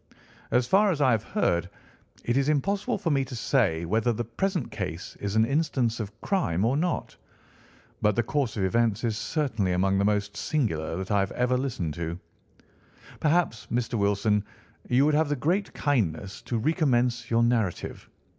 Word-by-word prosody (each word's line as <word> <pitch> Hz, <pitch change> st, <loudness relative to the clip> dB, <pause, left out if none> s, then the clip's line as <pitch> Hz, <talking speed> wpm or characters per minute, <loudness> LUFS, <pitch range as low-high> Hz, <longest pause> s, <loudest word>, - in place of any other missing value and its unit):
As 125 Hz, 0 st, +2 dB
far 200 Hz, -, +4 dB
as 165 Hz, -6 st, 0 dB
I 135 Hz, -3 st, +4 dB
have 110 Hz, -3 st, +2 dB
heard, 90 Hz, -, 0 dB, 0.6 s
it 120 Hz, -, +1 dB
is 135 Hz, +2 st, +2 dB
impossible 200 Hz, -, 0 dB
for 185 Hz, -5 st, -1 dB
me 135 Hz, -2 st, +2 dB
to 130 Hz, -1 st, -7 dB
say 105 Hz, -, +1 dB
whether 110 Hz, +6 st, +1 dB
the 120 Hz, +1 st, -2 dB
present 170 Hz, -, -2 dB
case 90 Hz, -3 st, -5 dB
is 100 Hz, 0 st, -3 dB
an 110 Hz, 0 st, +5 dB
instance 130 Hz, -4 st, 0 dB
of 105 Hz, 0 st, -6 dB
crime 110 Hz, -, 0 dB
or 125 Hz, +4 st, +2 dB
not, 170 Hz, +4 st, -1 dB, 0.9 s
but 105 Hz, -1 st, +3 dB
the 120 Hz, -, +2 dB
course 125 Hz, -2 st, -1 dB
of 100 Hz, -, 0 dB
events 115 Hz, +2 st, +1 dB
is 115 Hz, -2 st, 0 dB
certainly 115 Hz, -, -1 dB
among 95 Hz, +2 st, +2 dB
the -, -, +2 dB
most 105 Hz, 0 st, 0 dB
singular 80 Hz, -, -1 dB
that 95 Hz, +3 st, -4 dB
I 100 Hz, -, +3 dB
have 95 Hz, 0 st, 0 dB
ever 125 Hz, +1 st, +1 dB
listened 120 Hz, -, -2 dB
to. 85 Hz, +1 st, -3 dB, 1.0 s
Perhaps, 155 Hz, -7 st, +1 dB
Mr. 120 Hz, 0 st, -1 dB
Wilson, 105 Hz, -1 st, +2 dB, 0.5 s
you 130 Hz, +3 st, +4 dB
would 150 Hz, -, +3 dB
have 155 Hz, 0 st, +2 dB
the 145 Hz, -, +1 dB
great 175 Hz, +9 st, 0 dB
kindness 100 Hz, -, -1 dB
to 120 Hz, -, 0 dB
recommence 125 Hz, -3 st, +1 dB
your 115 Hz, 0 st, +3 dB
narrative. 115 Hz, -6 st, -1 dB
120 Hz, 175 wpm, -27 LUFS, 100-145 Hz, 1.0 s, an